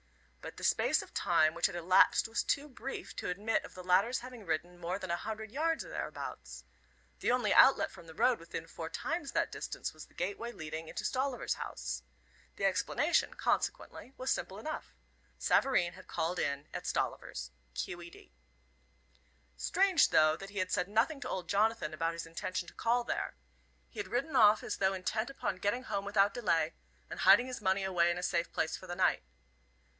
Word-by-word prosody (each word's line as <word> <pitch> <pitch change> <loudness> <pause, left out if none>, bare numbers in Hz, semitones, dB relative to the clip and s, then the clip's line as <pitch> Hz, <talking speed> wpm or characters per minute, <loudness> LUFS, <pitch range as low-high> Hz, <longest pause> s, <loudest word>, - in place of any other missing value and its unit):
But - - -8
the - - -9
space - - +3
of - - -16
time 155 0 +3
which 170 - +2
had - - -7
elapsed 175 +5 +5
was 225 +1 0
too 285 +1 0
brief 270 0 -7
to - - -3
admit 205 +5 0
of - - -11
the 185 - -8
latter's 195 +8 +3
having 250 -2 -9
ridden 175 0 -3
more 175 +2 -2
than 185 -3 -5
a - - +2
hundred 220 +3 -5
yards 320 +5 0
or - - -10
thereabouts. - - -6 0.6
The - - +1
only 250 0 +2
outlet 270 - +6
from 170 -3 -13
the 160 - -11
road 245 +1 +3
within 165 0 -6
four 165 0 -7
times 305 - -3
that - - +1
distance - - -5
was - - -11
the - - -26
gateway 320 -13 -3
leading 160 -4 -6
into - - -5
Stolliver's 260 -1 0
house. 60 - -5 0.5
The 195 - -1
explanation, 205 - +1
consequently, 385 - -2
was 255 - -1
simple 190 - -2
enough. 310 +9 -6 0.4
Savareen 175 -10 +3
had 185 - -14
called 175 +3 -1
in 140 +1 -1
at - - -5
Stollivers. 60 - -2 0.2
Q. 175 - -4
E. 170 - -9
D. 60 - -17 1.2
Strange, 370 - +3
though, 155 0 +5
that 195 +4 -9
he 205 - -10
had 185 -1 -1
said 180 -1 +1
nothing 230 +9 +1
to 255 - -4
old 180 -3 -3
Jonathan 210 -3 +1
about 165 +2 -1
his 165 - -5
intention 175 +2 -4
to - - -11
call 240 +1 +1
there. - - -3 0.5
He - - -10
had 410 - -3
ridden 275 +5 -2
off 215 -3 +6
as - - -3
though 190 0 +2
intent 215 +6 -2
upon 270 -8 -3
getting 205 +7 -1
home 195 - -2
without 200 0 +3
delay, 165 -8 +1 0.3
and - - -7
hiding 200 +6 +7
his 255 -2 -6
money 190 0 +2
away 175 -3 +3
in 175 - 0
a 180 - -4
safe 170 -2 0
place 160 - -1
for 185 - -10
the 175 - -4
night. 185 - +2
195 Hz, 195 wpm, -33 LUFS, 175-245 Hz, 1.2 s, hiding